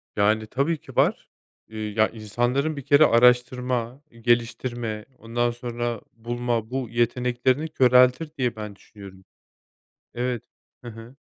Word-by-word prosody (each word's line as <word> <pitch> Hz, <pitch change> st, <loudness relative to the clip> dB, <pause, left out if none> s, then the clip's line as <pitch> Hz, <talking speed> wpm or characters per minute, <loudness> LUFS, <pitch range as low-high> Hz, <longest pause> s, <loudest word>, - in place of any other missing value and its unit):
Yani 110 Hz, +2 st, +2 dB
tabii 140 Hz, +8 st, 0 dB
ki -, -, -15 dB
var. -, -, +2 dB, 0.4 s
Eee, 110 Hz, 0 st, -8 dB
ya, 110 Hz, +1 st, +2 dB
insanların 120 Hz, +7 st, -1 dB
bir -, -, -4 dB
kere 145 Hz, +2 st, +6 dB
araştırma, 125 Hz, +1 st, +2 dB, 0.2 s
geliştirme, 120 Hz, -2 st, -1 dB
ondan 120 Hz, +1 st, -1 dB
sonra 120 Hz, -1 st, -4 dB
bulma, 120 Hz, -1 st, -3 dB
bu 130 Hz, -2 st, -3 dB
yeteneklerini 125 Hz, +4 st, 0 dB
köreltir 125 Hz, +2 st, +4 dB
diye 125 Hz, -2 st, 0 dB
ben 105 Hz, -2 st, -7 dB
düşünüyorum. 95 Hz, -2 st, -14 dB, 0.9 s
Evet. 120 Hz, -1 st, -2 dB, 0.4 s
Hı 120 Hz, -, -9 dB
hı. 115 Hz, +3 st, -12 dB
120 Hz, 120 wpm, -24 LUFS, 115-125 Hz, 0.9 s, kere